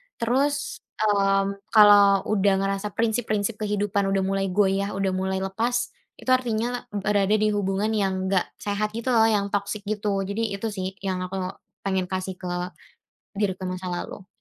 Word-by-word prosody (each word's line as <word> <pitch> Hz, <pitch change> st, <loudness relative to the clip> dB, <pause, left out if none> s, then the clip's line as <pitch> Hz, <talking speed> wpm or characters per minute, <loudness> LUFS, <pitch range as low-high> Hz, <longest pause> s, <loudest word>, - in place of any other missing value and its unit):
Terus, 275 Hz, +5 st, 0 dB, 0.2 s
mmm, 200 Hz, -1 st, +2 dB, 0.2 s
kalau 205 Hz, -2 st, +7 dB
udah 200 Hz, -2 st, +2 dB
ngerasa 195 Hz, +1 st, -1 dB
prinsip-prinsip 220 Hz, -2 st, 0 dB
kehidupan 205 Hz, -1 st, 0 dB
udah 195 Hz, 0 st, +1 dB
mulai 195 Hz, 0 st, 0 dB
goyah, 195 Hz, +1 st, +1 dB
udah 195 Hz, -1 st, 0 dB
mulai 190 Hz, 0 st, -1 dB
lepas, 230 Hz, +5 st, -1 dB, 0.2 s
itu -, -, -8 dB
artinya 245 Hz, -1 st, 0 dB
berada 205 Hz, 0 st, +2 dB
di 215 Hz, 0 st, +2 dB
hubungan 205 Hz, +1 st, 0 dB
yang 190 Hz, -3 st, 0 dB
nggak 185 Hz, -2 st, +2 dB
sehat 210 Hz, +1 st, -2 dB
gitu 235 Hz, +3 st, -1 dB
loh 225 Hz, -2 st, +5 dB
yang 200 Hz, -2 st, +1 dB
toxic 205 Hz, +1 st, -2 dB
gitu, 205 Hz, -1 st, -1 dB
jadi 200 Hz, +2 st, -2 dB
itu 220 Hz, +2 st, -3 dB
sih 190 Hz, -1 st, -4 dB
yang 190 Hz, -2 st, -1 dB
aku 190 Hz, -, -6 dB, 0.5 s
pengen 190 Hz, -2 st, 0 dB
kasih 185 Hz, 0 st, -4 dB
ke 180 Hz, -, -6 dB, 0.9 s
diriku 190 Hz, -3 st, -1 dB
masa 185 Hz, 0 st, -5 dB
lalu. 180 Hz, +2 st, -5 dB
200 Hz, 155 wpm, -25 LUFS, 195-215 Hz, 0.9 s, kalau